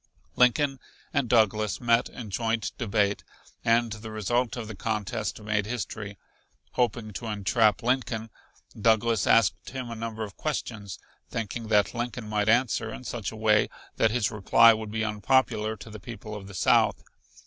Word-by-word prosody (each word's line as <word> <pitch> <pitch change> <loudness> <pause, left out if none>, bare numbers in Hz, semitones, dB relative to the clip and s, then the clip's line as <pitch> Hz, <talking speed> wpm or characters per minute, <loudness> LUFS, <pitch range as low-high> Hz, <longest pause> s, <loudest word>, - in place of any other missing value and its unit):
Lincoln 135 +2 +3 0.3
and 140 -5 +1
Douglas 110 -2 +2
met 120 0 +2
in 110 -5 -8
joint 115 +2 -1
debate, 100 -3 +1 0.4
and 115 0 +3
the 110 0 -8
result 115 +4 -1
of 115 -2 -5
the 110 - -6
contest 105 -1 -3
made 105 -1 -1
history. 105 -3 -5 0.5
Hoping 115 -3 -1
to 115 +3 -6
entrap 105 0 +2
Lincoln, 120 -3 -1 0.5
Douglas 115 0 +3
asked 95 -5 +3
him 130 -2 -6
a - - -5
number 110 0 -4
of 100 -3 -8
questions, 110 -9 -4 0.3
thinking 115 +1 -4
that 105 -2 +3
Lincoln 120 -1 -4
might 105 0 0
answer 115 -1 +2
in 125 - -8
such 115 -4 -4
a - - -9
way 110 -1 +3 0.3
that 115 - +4
his 115 -1 0
reply 115 +2 +6
would 110 -1 -5
be 110 +1 -2
unpopular 110 0 +1
to 110 +2 -11
the 105 - -8
people 110 +1 -8
of 100 -2 -7
the 100 - -10
South. - - +3
110 Hz, 160 wpm, -27 LUFS, 105-120 Hz, 0.5 s, reply